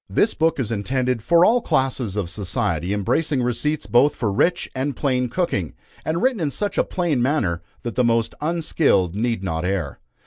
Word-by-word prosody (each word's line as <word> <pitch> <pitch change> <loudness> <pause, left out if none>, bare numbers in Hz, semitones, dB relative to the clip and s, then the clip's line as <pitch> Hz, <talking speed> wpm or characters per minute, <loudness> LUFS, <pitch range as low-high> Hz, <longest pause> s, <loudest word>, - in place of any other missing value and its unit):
This 220 - +2
book 160 -2 +1
is 120 -4 -2
intended 125 +3 -1
for 170 +8 +5
all 240 +2 +4
classes 130 - -1
of 100 -4 -1
society, 90 -1 -2
embracing 130 - 0
receipts 125 +6 -1
both 135 +5 +3
for 105 -4 -1
rich 165 - +1
and 135 +1 -2
plain 125 -2 0
cooking, 110 - -2 0.3
and 165 +3 -1
written 255 -4 +2
in 155 -4 0
such 205 +8 -2
a - - +4
plain 170 -8 -1
manner, 120 - 0 0.2
that 120 - -4
the 125 - +1
most 115 -1 +1
unskilled 155 - +1
need 115 -2 -1
not 80 -3 -2
err. 90 -6 -2
125 Hz, 180 wpm, -22 LUFS, 100-155 Hz, 0.3 s, for